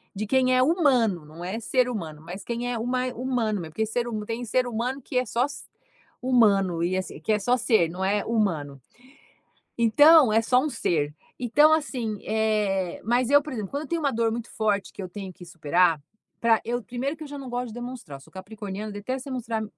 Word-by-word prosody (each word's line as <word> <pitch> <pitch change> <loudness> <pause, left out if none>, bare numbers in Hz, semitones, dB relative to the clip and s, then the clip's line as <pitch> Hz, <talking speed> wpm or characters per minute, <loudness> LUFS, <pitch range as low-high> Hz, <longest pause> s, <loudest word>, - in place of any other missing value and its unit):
de 210 +2 -2
quem 255 +2 +3
é 255 - +5
humano, 255 - +2
não 160 +3 -10
é 190 +5 -3
ser 250 +2 +1
humano, 160 -10 -5
mas 180 +5 -8
quem 240 +1 -2
é 240 - -2
huma 250 +2 -1
humano, 235 -4 -1
mesmo, 155 -1 -9
por 220 - +1
ser 235 +2 -2
huma 215 -3 -4
tem 230 +2 -4
um - - -4
ser 250 +3 +1
humano, 245 +4 -2
que 255 - -4
é 255 - +2
só 240 +3 0
se - - -9 0.6
humano, 200 -9 +3
e 180 +2 0
assim, 185 - -5
que 220 - 0
é 210 - +1
só 245 +5 +2
ser 220 -8 +3
não 185 +3 -3
é 205 +1 +1
humano. 160 - -1 1.0
Então 275 +3 +7
é 225 +1 +4
só 250 +2 +3
um 305 - -1
ser. 150 - -1 0.3
Então 295 +6 +5
assim 250 -9 -1
eh, 210 -4 0
mas 240 +3 +1
eu, 285 0 +6
por 300 - -7
exemplo, 210 -5 -4
quando 285 +1 -3
eu - - -10
tenho 335 -1 -1
uma 280 -2 +1
dor 225 0 +1
muito 235 0 -5
forte 210 -3 -1
que - - -8
eu 185 - -5
tenho 190 +1 -7
que 175 0 -13
superar 170 0 +2 0.4
pra 230 -1 +4
eu 240 +2 -2
primeiro 250 +7 -3
que 315 - -11
eu - - -9
já 285 0 -7
não 270 -2 -8
gosto 245 0 -3
de 220 - -10
demonstrar, 245 - -7
eu - - -19
sou - - -19
capricorniana, 205 +1 -7
detesto 255 +7 -5
mostrar 230 -3 -3
225 Hz, 225 wpm, -25 LUFS, 195-250 Hz, 1.0 s, Então